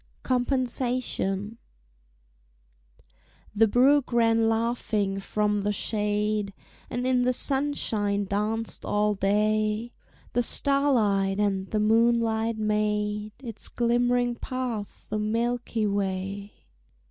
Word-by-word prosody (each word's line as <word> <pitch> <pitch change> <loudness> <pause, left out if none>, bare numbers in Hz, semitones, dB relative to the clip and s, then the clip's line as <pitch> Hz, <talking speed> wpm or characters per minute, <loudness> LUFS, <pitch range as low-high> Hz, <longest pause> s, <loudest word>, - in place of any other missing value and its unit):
COMPENSATION 245 -5 -1 1.9
The 220 +1 +4
brook 265 +5 +3
ran 225 -1 +3
laughing 225 -3 -1
from 210 +1 0
the 205 +1 0
shade, 210 -1 -1 0.3
And 245 +1 -3
in 255 -1 +2
the 250 +1 +2
sunshine 225 -8 +2
danced 215 +3 -2
all 210 0 +1
day: 215 +3 0 0.4
The 245 - +2
starlight 225 -8 +2
and 195 -2 0
the 215 - -1
moonlight 225 0 +2
made 210 0 -1
Its 230 -4 -7
glimmering 245 +1 +1
path 245 -6 -5
a 215 - -1
Milky 230 +1 -1
Way. 200 0 -3
215 Hz, 95 wpm, -26 LUFS, 205-240 Hz, 1.9 s, The